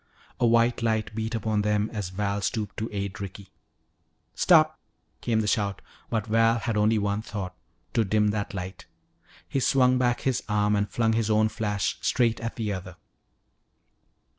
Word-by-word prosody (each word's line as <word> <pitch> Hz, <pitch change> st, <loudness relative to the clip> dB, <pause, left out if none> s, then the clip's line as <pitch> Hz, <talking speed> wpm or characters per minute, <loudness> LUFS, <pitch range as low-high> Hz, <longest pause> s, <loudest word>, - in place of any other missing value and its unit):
A 120 Hz, -, +4 dB
white 115 Hz, +1 st, +3 dB
light 110 Hz, -1 st, 0 dB
beat 110 Hz, +1 st, -3 dB
upon 110 Hz, -1 st, 0 dB
them 105 Hz, 0 st, +1 dB
as 105 Hz, -4 st, -3 dB
Val 100 Hz, +1 st, -2 dB
stooped 105 Hz, 0 st, -2 dB
to 110 Hz, -, -3 dB
aid 100 Hz, -2 st, -4 dB
Ricky. 100 Hz, 0 st, -8 dB, 0.8 s
"Stop!" 155 Hz, -3 st, +4 dB, 0.4 s
came 115 Hz, -2 st, +1 dB
the 105 Hz, -, -2 dB
shout, 100 Hz, -2 st, 0 dB, 0.3 s
but 110 Hz, -2 st, -1 dB
Val 115 Hz, +1 st, +3 dB
had 115 Hz, -1 st, -2 dB
only 105 Hz, +1 st, +3 dB
one 100 Hz, 0 st, 0 dB
thought, 100 Hz, -4 st, -5 dB, 0.4 s
to 115 Hz, -, +3 dB
dim 105 Hz, +1 st, +2 dB
that 105 Hz, -1 st, -3 dB
light. 90 Hz, 0 st, -6 dB, 0.6 s
He 135 Hz, -, -1 dB
swung 130 Hz, -1 st, +3 dB
back 120 Hz, -1 st, +1 dB
his 130 Hz, -2 st, 0 dB
arm 105 Hz, 0 st, +2 dB
and 100 Hz, 0 st, 0 dB
flung 115 Hz, -1 st, +1 dB
his 110 Hz, -1 st, 0 dB
own 110 Hz, 0 st, +3 dB
flash 105 Hz, -4 st, -2 dB
straight 115 Hz, -2 st, +2 dB
at 115 Hz, 0 st, -4 dB
the 110 Hz, -3 st, -2 dB
other. 95 Hz, -2 st, -7 dB
110 Hz, 165 wpm, -26 LUFS, 100-115 Hz, 0.8 s, A